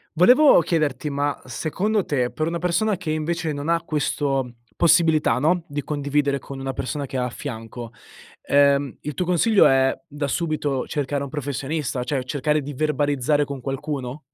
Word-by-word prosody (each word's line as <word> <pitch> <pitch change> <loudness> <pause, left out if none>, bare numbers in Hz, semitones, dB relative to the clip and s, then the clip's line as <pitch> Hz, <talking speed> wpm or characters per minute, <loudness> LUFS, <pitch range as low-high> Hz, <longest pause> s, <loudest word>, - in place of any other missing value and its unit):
Volevo 250 - +7
chiederti 150 -5 0
ma, 145 0 -2
secondo 185 - -1
te, 125 -4 0
per 155 - -2
una 170 +1 -2
persona 180 +4 +1
che 180 -4 -6
invece 160 +1 -1
non 145 0 -5
ha 165 0 +2
questo 135 -5 -1 0.2
possibilità, 160 -7 +3
no, 165 +5 +2
di 145 -2 -3
condividere 145 -1 0
con 135 0 -9
una 135 0 -3
persona 140 +2 -4
che 135 - -4
ha 125 - 0
a - - -3
fianco, 115 0 -7 0.5
ehm, 140 -1 +3
il 150 - -5
tuo 180 - -1
consiglio 190 +5 +4
è 135 0 +3
da 145 -1 -4
subito 150 -3 -1
cercare 140 -1 -2
un 140 - -6
professionista, 140 -1 -3
cioè 130 0 -2
cercare 150 +3 0
di 145 +1 -6
verbalizzare 145 -1 +1
con 140 -2 -6
qualcuno? 135 0 -4
145 Hz, 165 wpm, -23 LUFS, 135-155 Hz, 0.5 s, Volevo